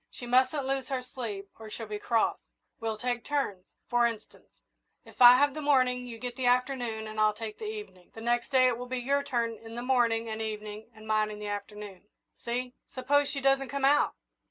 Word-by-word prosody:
She 245 - -9
mustn't 260 +3 +2
lose 270 -1 -1
her 260 -2 -2
sleep, 220 -6 -6
or 220 -1 -9
she'll 225 +1 -6
be 210 -1 -5
cross. 230 +1 +1 0.4
We'll 225 -2 -2
take 245 +1 -2
turns. 265 -11 -2 0.2
For 240 0 +3
instance, 225 -2 -10 0.4
if - - -13
I 245 0 +11
have 285 +1 +3
the 305 - -5
morning, 255 -3 +2
you 230 -2 -7
get 245 +1 -5
the 255 -1 -1
afternoon, 245 -3 +1
and 215 0 -6
I'll 215 0 +3
take 220 -1 -6
the - - -5
evening. 420 - -8
The 225 - -8
next 240 +1 0
day 260 -2 +5
it 245 -2 +2
will 250 - -6
be 255 +1 -3
your 275 +3 +1
turn 235 -3 -1
in 225 +1 -10
the 240 - -4
morning 235 -3 +2
and 220 0 -4
evening, 215 0 -6
and 215 0 -13
mine 215 0 +2
in 210 - -7
the 210 - -7
afternoon 205 -1 -7 0.4
see?" 245 +1 -3 0.2
"Suppose 285 +2 +1
she 275 - -2
doesn't 270 -1 +2
come 280 +1 -1
out?" 285 +2 +4
240 Hz, 215 wpm, -29 LUFS, 220-260 Hz, 0.4 s, I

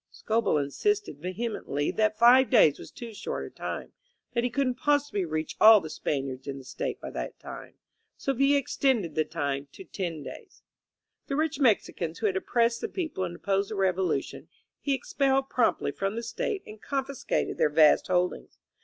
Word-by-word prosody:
'* - - -59
Scobell 225 -7 0
insisted 405 - -1
vehemently 185 -5 -2
that 215 -1 +1
five 245 +3 +6
days 205 - +5
was - - -10
too 235 -2 -9
short - - -4
a - - -10
time, - - -6 0.4
that 235 -1 +1
he 245 - +1
couldn't 255 +1 0
possibly 290 -9 +1
reach 155 -1 -3
all 220 0 +10
the 160 -4 -8
Spaniards 135 -3 -3
in 140 -1 -4
the 135 - -10
State 130 +1 -4
by - - -7
that - - -5
time; - - -10 0.4
so 275 - -1
Villa 275 +2 +3
extended 250 - 0
the 155 - +2
time 145 -3 -3
to - - -10
ten 170 - -5
days. 420 - -11 0.6
The 275 - -2
rich 305 -1 0
Mexicans 195 - +1
who 225 - -3
had 195 -3 +1
oppressed 235 +4 +1
the - - -3
people 315 - -3
and 175 -1 -6
opposed 195 +2 -1
the 215 - -4
Revolution, 185 -6 -1 0.3
he 280 -2 0
expelled 270 0 0
promptly 230 - +1
from 195 +7 -3
the 235 - -4
State 380 - -3
and 215 0 -12
confiscated 275 -1 -2
their - - +4
vast 150 0 +5
holdings. 180 0 -1
215 Hz, 180 wpm, -28 LUFS, 160-265 Hz, 0.6 s, all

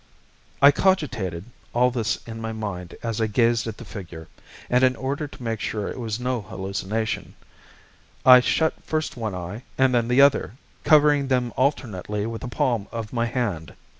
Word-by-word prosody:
I 140 - +10
cogitated 125 - 0 0.3
all 125 +1 +4
this 115 -3 -1
in 115 -1 -7
my 115 0 -4
mind 100 -5 -5
as 115 -1 -2
I 110 - +2
gazed 115 +1 +2
at 110 - -5
the - - -10
figure, 85 -5 -9 0.4
and 125 +1 +2
in 130 0 +4
order 140 +4 -3
to 135 - -12
make 115 -2 -2
sure 105 -2 -3
it - - -7
was 110 -2 -3
no 125 -1 -1
hallucination, 100 +3 -4 0.9
I 125 -1 +10
shut 160 +5 +1
first 155 0 -2
one 110 -5 -4
eye 90 +5 -6 0.2
and 130 -1 +3
then 120 -1 +2
the 125 +2 +2
other, 140 -7 +4 0.3
covering 145 -2 +5
them 125 -3 0
alternately 105 -7 -1
with 115 0 -5
the - - -5
palm 120 -3 0
of 115 -1 -6
my 115 -1 0
hand. 105 - -3
115 Hz, 175 wpm, -24 LUFS, 105-130 Hz, 0.9 s, I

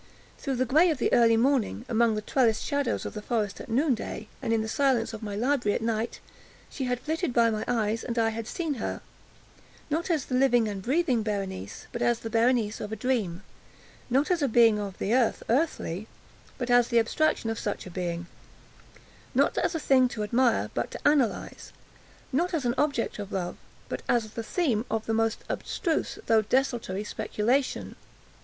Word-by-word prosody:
Through 275 -3 -2
the 255 +1 +1
gray 315 +8 +4
of 310 - 0
the 250 - 0
early 230 -1 +5
morning—among 235 -2 +1
the 215 - -3
trellised 230 -2 +2
shadows 285 -4 -1
of - - -5
the 210 - -5
forest 210 -3 -2
at - - -10
noonday—and 250 -3 -1
in 225 -1 +2
the - - -4
silence 240 -2 +1
of 220 - -7
my 205 -2 -4
library 240 -1 +1
at - - -2
night—she 230 +3 -5
had 250 -1 -1
flitted 315 +3 -2
by 230 -1 +4
my 215 -1 -2
eyes, 225 -2 0
and 235 -1 -4
I 225 -1 +3
had 225 0 -5
seen 325 +1 -2
her—not 325 +5 -7
as 315 -6 +1
the - - -6
living 250 -3 +4
and 200 -2 -4
breathing 265 - +1
Berenice, 195 - -4
but 235 - -5
as 240 -1 +3
the 225 -1 -7
Berenice 230 -2 +2
of 210 - -5
a - - -2
dream; 215 -6 -1 0.7
not 275 +7 +2
as 350 -3 +2
a 280 - +3
being 225 -3 +5
of 200 -2 -5
the 210 - -1
earth, 250 -3 +2
earthy, 225 - 0 0.5
but 245 -2 -2
as 245 -1 +5
the 235 - +1
abstraction 230 0 +1
of 225 - -4
such 205 - -3
a 185 - -9
being; 175 -1 -3 1.1
not - - +3
as 335 - 0
a - - 0
thing 265 -3 +4
to 215 -3 -4
admire, 235 +3 +2
but - - -2
to - - -2
analyze; 285 -7 0 0.6
not 345 +6 +1
as 290 -6 -2
an 240 - +2
object 280 -7 0
of 205 -1 -6
love, 180 -2 -3 0.3
but - - -4
as 225 -3 +1
the 230 - -4
theme 230 - 0
of 220 0 -1
the 225 - -1
most 225 0 0
abstruse 330 -6 -2
although 225 -1 +4
desultory 235 -4 0
speculation. 220 +5 -1
235 Hz, 185 wpm, -27 LUFS, 215-265 Hz, 1.1 s, early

